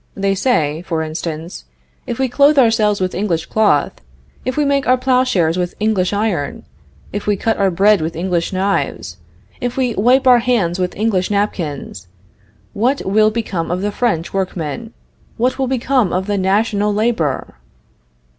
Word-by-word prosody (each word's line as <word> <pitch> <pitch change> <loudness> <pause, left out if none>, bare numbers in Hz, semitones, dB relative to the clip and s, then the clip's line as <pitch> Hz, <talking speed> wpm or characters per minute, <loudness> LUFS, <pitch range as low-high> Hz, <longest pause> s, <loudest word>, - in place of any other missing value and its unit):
They 195 0 0
say, 165 - 0
for 165 -3 -2
instance, 160 - -6 0.4
"If 235 - -3
we 265 - +1
clothe 280 +4 +3
ourselves 225 -5 +3
with 185 -1 -1
English 175 -4 -1
cloth, 205 - +1 0.4
if 255 +2 -2
we 300 - +2
make 280 -1 +1
our 255 +1 +4
plowshares 250 -10 +1
with 175 0 -2
English 210 -4 +1
iron, 200 -8 -2 0.5
if 205 +1 -4
we 205 - +3
cut 225 +3 0
our 195 -1 +3
bread 195 +2 +3
with 160 +1 -3
English 175 0 -1
knives, 185 - -2 0.4
if 245 +1 -3
we 250 -3 +1
wipe 250 +7 +3
our 250 -2 +7
hands 210 -8 0
with 180 -1 -2
English 205 -4 0
napkins, 160 - -3 0.7
what 250 +7 0
will 215 +2 +3
become 215 -7 -3
of 180 +2 -2
the 205 - -1
French 205 -7 -1
workmen 190 +3 -3 0.5
what 255 +3 0
will 265 - +1
become 255 -5 +1
of 185 +1 -1
the 205 -1 -1
national 205 +2 +1
labor?" 205 - -1
205 Hz, 160 wpm, -17 LUFS, 175-235 Hz, 0.7 s, our